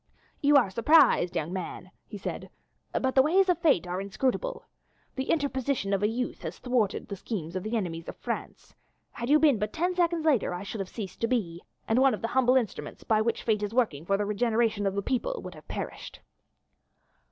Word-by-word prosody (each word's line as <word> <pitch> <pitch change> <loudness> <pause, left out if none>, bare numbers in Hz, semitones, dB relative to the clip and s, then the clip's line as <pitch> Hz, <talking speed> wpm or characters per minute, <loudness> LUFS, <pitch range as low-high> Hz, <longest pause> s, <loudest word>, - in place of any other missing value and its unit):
"You 290 0 +4
are 235 -8 +3
surprised, 230 - +4
young 165 +1 -2
man," 185 0 -6 0.2
he 205 - -7
said, 200 - -5 0.4
"but 260 0 0
the 265 - +6
ways 370 +7 +3
of 360 - +2
fate 275 - +3
are 180 +2 -3
inscrutable. 265 - -2 0.5
The 265 0 -4
interposition 275 -8 0
of 195 - +1
a 210 - +3
youth 245 +3 -3
has - - -6
thwarted 245 -6 0
the 200 - -5
schemes 185 -4 -5
of 185 - -1
the 215 +4 -2
enemies 165 -5 -4
of - - -7
France. - - -6 0.4
Had 235 +1 -5
you 300 - +7
been 295 -7 +4
but 210 +1 -2
ten 355 +3 0
seconds 340 -2 +1
later 255 - +2
I 180 - -5
should 205 +2 -6
have 195 -1 -4
ceased 205 -5 -7
to 230 - +2
be, 180 -9 -1 0.3
and 225 +3 +3
one 270 0 +4
of - - -13
the 230 - -1
humble 255 0 +3
instruments 235 -7 -2
by 215 -1 +2
which 230 +1 -1
fate 215 -2 +1
is 210 +2 -3
working 210 - +1
for 195 +3 +1
the 205 - -1
regeneration 220 0 +1
of 195 - -1
the 200 - -1
people 370 - -1
would - - -7
have - - -15
perished." - - -6
230 Hz, 210 wpm, -28 LUFS, 195-265 Hz, 0.5 s, you